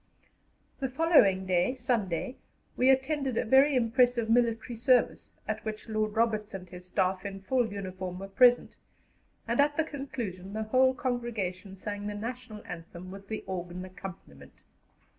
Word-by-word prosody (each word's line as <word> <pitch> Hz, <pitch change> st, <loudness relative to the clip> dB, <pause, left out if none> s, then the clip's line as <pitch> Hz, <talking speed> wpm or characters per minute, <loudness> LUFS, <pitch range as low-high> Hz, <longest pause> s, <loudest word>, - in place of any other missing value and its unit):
The 265 Hz, -2 st, -1 dB
following 255 Hz, -, +4 dB
day, 185 Hz, +7 st, +2 dB
Sunday, 240 Hz, -, -1 dB, 0.4 s
we 255 Hz, -, +3 dB
attended 265 Hz, -1 st, +1 dB
a -, -, +1 dB
very 270 Hz, +4 st, +5 dB
impressive 240 Hz, -1 st, +3 dB
military 235 Hz, +1 st, +2 dB
service, 245 Hz, +2 st, +2 dB
at 215 Hz, 0 st, -3 dB
which 215 Hz, 0 st, -5 dB
Lord 215 Hz, -1 st, -1 dB
Roberts 220 Hz, -2 st, 0 dB
and 185 Hz, -1 st, -7 dB
his 180 Hz, 0 st, -11 dB
Staff, 185 Hz, 0 st, 0 dB
in 195 Hz, -1 st, -6 dB
full 245 Hz, 0 st, +1 dB
uniform, 185 Hz, -2 st, -5 dB
were 195 Hz, +1 st, -6 dB
present, 245 Hz, +5 st, +4 dB, 0.7 s
and 235 Hz, +3 st, 0 dB
at 290 Hz, +1 st, +3 dB
the 320 Hz, -, +3 dB
conclusion 235 Hz, -, -6 dB
the 220 Hz, 0 st, -2 dB
whole 260 Hz, +4 st, +3 dB
congregation 215 Hz, -7 st, -3 dB
sang 205 Hz, +1 st, -5 dB
the 210 Hz, -, -4 dB
National 230 Hz, 0 st, -6 dB
Anthem 175 Hz, +1 st, -8 dB
with 195 Hz, +1 st, -10 dB
the 215 Hz, 0 st, -4 dB
organ 180 Hz, 0 st, -5 dB
accompaniment. 175 Hz, -, -11 dB
215 Hz, 150 wpm, -29 LUFS, 190-250 Hz, 0.7 s, very